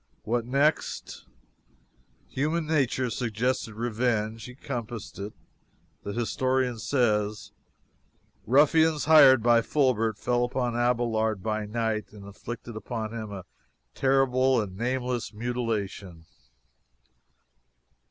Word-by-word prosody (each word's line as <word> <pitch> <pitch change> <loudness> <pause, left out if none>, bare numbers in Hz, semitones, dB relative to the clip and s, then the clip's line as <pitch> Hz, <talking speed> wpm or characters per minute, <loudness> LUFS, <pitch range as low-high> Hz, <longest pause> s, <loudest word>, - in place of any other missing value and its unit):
What 120 +1 -1
next? 140 +5 -1 1.0
Human 155 +4 -1
nature 130 -5 0
suggested 115 -1 -2
revenge. 115 -1 -1
He 125 - -10
compassed 120 -6 -6
it. 100 +2 -5 0.7
The 100 - -5
historian 125 +2 0
says: 110 -3 0 1.0
"Ruffians, 150 +4 +4
hired 140 -6 +7
by 120 -1 +5
Fulbert, 115 -5 +1
fell 120 +3 0
upon 120 -1 -1
Abelard 115 -4 0
by 110 0 -2
night, 110 -1 -2
and 100 -2 -11
inflicted 115 +3 -8
upon 110 0 -5
him 110 -2 -6
a 95 -3 -7 0.5
terrible 130 -1 +2
and 100 -4 -4
nameless 125 +2 -2
mutilation." 105 -7 -4
120 Hz, 100 wpm, -27 LUFS, 110-130 Hz, 1.0 s, hired